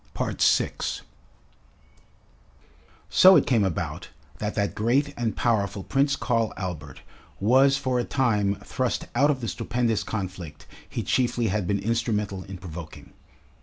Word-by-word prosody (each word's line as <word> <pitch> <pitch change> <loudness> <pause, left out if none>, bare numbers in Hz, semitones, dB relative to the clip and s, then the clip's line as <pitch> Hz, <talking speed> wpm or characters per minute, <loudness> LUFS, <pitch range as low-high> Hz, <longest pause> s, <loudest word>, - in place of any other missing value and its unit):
6 - - +1 2.1
So 190 +1 +8
it 150 - +4
came 115 -5 +2
about 95 -5 -3 0.3
that 105 0 -3
that 100 -1 0
great 130 +7 +1
and 115 -2 -2
powerful 100 -4 0
Prince 140 +5 +1
Karl 115 -3 0
Albert 75 -7 -6 0.4
was 135 +6 +4
for 130 -2 -1
a - - 0
time 105 -7 +1
thrust 130 -2 -2
out 140 +5 +3
of 135 -3 0
the 115 - -3
stupendous 115 +1 -1
conflict 95 -8 -6 0.2
he - - -3
chiefly 120 -3 +1
had 100 -2 -1
been 100 - +1
instrumental 105 -3 -1
in 95 -1 -8
provoking. 85 -3 -10
110 Hz, 130 wpm, -25 LUFS, 100-125 Hz, 2.1 s, So